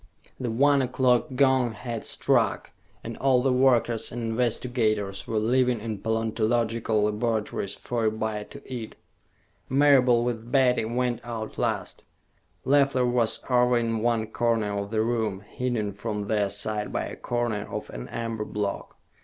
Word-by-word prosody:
The 125 Hz, -, -2 dB
one 140 Hz, +4 st, +3 dB
o'clock 130 Hz, +1 st, +1 dB
gong 130 Hz, -3 st, +3 dB
had 115 Hz, +1 st, -5 dB
struck, -, -, +1 dB, 0.3 s
and -, -, -6 dB
all 130 Hz, -2 st, +3 dB
the 135 Hz, -1 st, +2 dB
workers 125 Hz, -3 st, +2 dB
and 120 Hz, 0 st, -5 dB
investigators 115 Hz, -3 st, -1 dB
were 110 Hz, -, -1 dB
leaving 125 Hz, +2 st, +2 dB
in 110 Hz, -1 st, -5 dB
paleontological 110 Hz, 0 st, 0 dB
laboratories 105 Hz, -2 st, -1 dB
for 120 Hz, -2 st, -3 dB
a 110 Hz, -, +3 dB
bite 110 Hz, -1 st, -4 dB
to 140 Hz, -, -11 dB
eat. 120 Hz, -4 st, -6 dB, 0.7 s
Marable, 130 Hz, -4 st, +5 dB
with 120 Hz, -1 st, -3 dB
Betty, 125 Hz, -4 st, +3 dB
went 120 Hz, +1 st, -1 dB
out 115 Hz, -2 st, -6 dB
last. -, -, -2 dB, 0.6 s
Leffler 140 Hz, -2 st, +3 dB
was 120 Hz, -2 st, +1 dB
over 125 Hz, -1 st, +3 dB
in 115 Hz, -1 st, 0 dB
one 115 Hz, -1 st, +1 dB
corner 110 Hz, -3 st, 0 dB
of 100 Hz, 0 st, -3 dB
the 110 Hz, 0 st, 0 dB
room, 110 Hz, -4 st, -1 dB
hidden 110 Hz, -1 st, -3 dB
from 105 Hz, +1 st, -4 dB
their 105 Hz, -1 st, +1 dB
sight 105 Hz, +1 st, -1 dB
by -, -, -2 dB
a -, -, -7 dB
corner 120 Hz, -4 st, -2 dB
of -, -, -5 dB
an -, -, -7 dB
amber 115 Hz, -2 st, -4 dB
block. 105 Hz, -1 st, -4 dB
115 Hz, 150 wpm, -26 LUFS, 110-125 Hz, 0.7 s, Marable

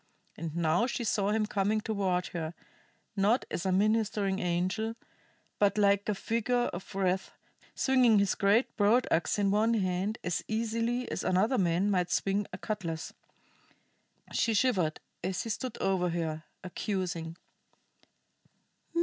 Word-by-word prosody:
And 165 Hz, -1 st, -6 dB
now 170 Hz, +7 st, +2 dB
she 245 Hz, -, -3 dB
saw 205 Hz, -3 st, +1 dB
him 215 Hz, 0 st, +1 dB
coming 210 Hz, +1 st, 0 dB
toward 195 Hz, -5 st, 0 dB
her, 165 Hz, -2 st, -4 dB, 0.6 s
not 210 Hz, +6 st, +2 dB
as 185 Hz, -, -2 dB
a -, -, +2 dB
ministering 205 Hz, -1 st, +1 dB
angel, 185 Hz, +6 st, -1 dB, 0.6 s
but 205 Hz, 0 st, +3 dB
like 200 Hz, 0 st, +3 dB
a 210 Hz, -, +1 dB
figure 235 Hz, +4 st, 0 dB
of 190 Hz, +3 st, -8 dB
wrath, 190 Hz, -1 st, 0 dB, 0.5 s
swinging 255 Hz, -4 st, +4 dB
his 200 Hz, -1 st, +3 dB
great 205 Hz, +5 st, +2 dB
broad 225 Hz, +4 st, +4 dB
ax 165 Hz, +5 st, +1 dB
in 200 Hz, -1 st, +2 dB
one 220 Hz, +3 st, +3 dB
hand 190 Hz, +1 st, -1 dB
as 175 Hz, -1 st, -1 dB
easily 230 Hz, +2 st, -1 dB
as -, -, -3 dB
another 210 Hz, +7 st, +2 dB
man 180 Hz, +3 st, +2 dB
might 180 Hz, -2 st, +1 dB
swing 200 Hz, +1 st, 0 dB
a -, -, -6 dB
cutlas. 175 Hz, -7 st, -4 dB, 1.2 s
She 225 Hz, -1 st, +1 dB
shivered 190 Hz, -10 st, +2 dB, 0.2 s
as 185 Hz, 0 st, -1 dB
he 230 Hz, -, -3 dB
stood 250 Hz, +2 st, -4 dB
over 185 Hz, -2 st, +1 dB
her, 165 Hz, -2 st, -3 dB, 0.2 s
accusing. 175 Hz, -3 st, -3 dB
200 Hz, 140 wpm, -30 LUFS, 180-220 Hz, 1.2 s, swinging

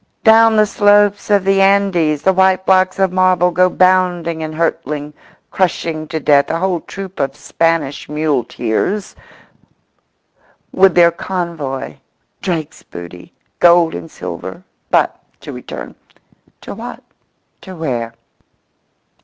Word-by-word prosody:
Down 225 Hz, 0 st, +6 dB
the 215 Hz, 0 st, +4 dB
slopes 205 Hz, 0 st, +2 dB
of 205 Hz, -2 st, +3 dB
the 195 Hz, 0 st, +2 dB
Andes 190 Hz, -6 st, +2 dB
the 190 Hz, -, +3 dB
white 190 Hz, 0 st, +2 dB
blocks 185 Hz, 0 st, +3 dB
of 190 Hz, -1 st, +1 dB
marble 185 Hz, -1 st, +2 dB
go 185 Hz, +1 st, +3 dB
bounding 180 Hz, -3 st, +1 dB
and 155 Hz, 0 st, -5 dB
hurtling, 150 Hz, -2 st, -3 dB, 0.4 s
crushing 165 Hz, -4 st, -2 dB
to 160 Hz, -, -4 dB
death 140 Hz, -1 st, +3 dB
a 165 Hz, -, -1 dB
whole 180 Hz, 0 st, -1 dB
troop 195 Hz, +2 st, -9 dB
of 135 Hz, -1 st, -2 dB
Spanish 150 Hz, -1 st, -1 dB
muleteers, 150 Hz, -, -2 dB, 1.6 s
with 190 Hz, -1 st, +4 dB
their 170 Hz, -1 st, +6 dB
convoy—Drake's 165 Hz, -1 st, -6 dB
booty, 85 Hz, 0 st, -11 dB, 0.3 s
gold 170 Hz, -1 st, +5 dB
and 85 Hz, -2 st, -7 dB
silver. -, -, -8 dB, 0.3 s
But -, -, +1 dB, 0.2 s
to -, -, -8 dB
return——To -, -, -12 dB
what, -, -, -9 dB, 0.6 s
to 185 Hz, -, -10 dB
where? 120 Hz, -8 st, -4 dB
175 Hz, 115 wpm, -16 LUFS, 155-190 Hz, 1.6 s, Down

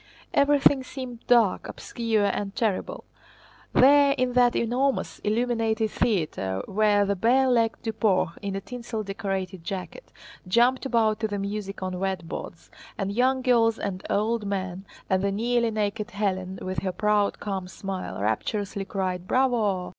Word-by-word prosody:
Everything 280 Hz, -1 st, +4 dB
seemed 255 Hz, -3 st, -7 dB
dark, 235 Hz, -5 st, +3 dB
obscure, 225 Hz, -4 st, -1 dB
and 200 Hz, 0 st, -2 dB
terrible. 220 Hz, -6 st, -1 dB, 0.7 s
There 280 Hz, +1 st, +6 dB
in 255 Hz, -1 st, 0 dB
that 245 Hz, -1 st, +4 dB
enormous, 255 Hz, +4 st, 0 dB
illuminated 225 Hz, -1 st, 0 dB
theater 150 Hz, -, -1 dB
where 205 Hz, 0 st, +3 dB
the 200 Hz, 0 st, 0 dB
bare 245 Hz, +7 st, +3 dB
legged 230 Hz, -3 st, +1 dB
Duport, 215 Hz, -6 st, +1 dB
in 200 Hz, -1 st, -3 dB
a 195 Hz, -, -3 dB
tinsel 235 Hz, -1 st, -5 dB
decorated 195 Hz, -2 st, -4 dB
jacket, 190 Hz, -, -6 dB, 0.4 s
jumped 245 Hz, +7 st, +3 dB
about 225 Hz, -4 st, +2 dB
to 220 Hz, -, 0 dB
the 205 Hz, -1 st, -3 dB
music 200 Hz, -1 st, -4 dB
on 185 Hz, -1 st, -3 dB
wet 190 Hz, -3 st, -2 dB
boards, 165 Hz, -, -8 dB, 0.3 s
and 195 Hz, -1 st, -2 dB
young 255 Hz, +4 st, +2 dB
girls 230 Hz, -3 st, +3 dB
and 190 Hz, -2 st, -4 dB
old 220 Hz, +2 st, 0 dB
men, 190 Hz, -1 st, -4 dB, 0.2 s
and 190 Hz, -1 st, +1 dB
the 200 Hz, 0 st, 0 dB
nearly 235 Hz, +3 st, +1 dB
naked 210 Hz, -1 st, -2 dB
Hélène 190 Hz, -2 st, -3 dB
with 185 Hz, 0 st, -2 dB
her 190 Hz, -, -2 dB
proud, 210 Hz, +2 st, +1 dB
calm 195 Hz, -3 st, -4 dB
smile, 190 Hz, 0 st, -5 dB
rapturously 195 Hz, -, -2 dB
cried 185 Hz, -2 st, -3 dB
"bravo!" 220 Hz, -8 st, +1 dB
210 Hz, 145 wpm, -26 LUFS, 195-240 Hz, 0.7 s, There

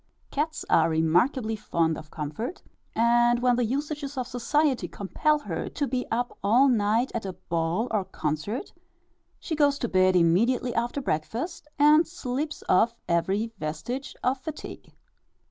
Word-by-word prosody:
Cats 305 Hz, +2 st, -2 dB
are 165 Hz, 0 st, +4 dB
remarkably 180 Hz, -, +2 dB
fond 165 Hz, -6 st, 0 dB
of 155 Hz, -, -10 dB
comfort, 160 Hz, -, -5 dB, 0.3 s
and 240 Hz, +1 st, +4 dB
when 245 Hz, 0 st, +3 dB
the 245 Hz, -, +1 dB
usages 285 Hz, +3 st, -3 dB
of 255 Hz, -, -1 dB
society 255 Hz, -, 0 dB
compel 200 Hz, -, 0 dB
her 195 Hz, -, -4 dB
to 285 Hz, -, -2 dB
be 255 Hz, -1 st, -2 dB
up 245 Hz, +2 st, -1 dB
all 240 Hz, +7 st, +5 dB
night 225 Hz, 0 st, +2 dB
at 230 Hz, -, -2 dB
a 190 Hz, -1 st, -4 dB
ball 170 Hz, +4 st, -1 dB
or 210 Hz, -3 st, +1 dB
concert, 155 Hz, -, -3 dB, 0.7 s
she 330 Hz, -, -5 dB
goes 290 Hz, -2 st, +3 dB
to 240 Hz, -, -2 dB
bed 185 Hz, -2 st, +3 dB
immediately 230 Hz, +9 st, +3 dB
after 240 Hz, +4 st, -1 dB
breakfast, 255 Hz, -, -3 dB
and 300 Hz, +3 st, +6 dB
sleeps 300 Hz, -2 st, -4 dB
off 230 Hz, +5 st, +3 dB
every 190 Hz, +6 st, 0 dB
vestige 160 Hz, -, -4 dB
of 260 Hz, +1 st, +1 dB
fatigue. 305 Hz, +3 st, -8 dB
235 Hz, 145 wpm, -26 LUFS, 185-275 Hz, 0.7 s, and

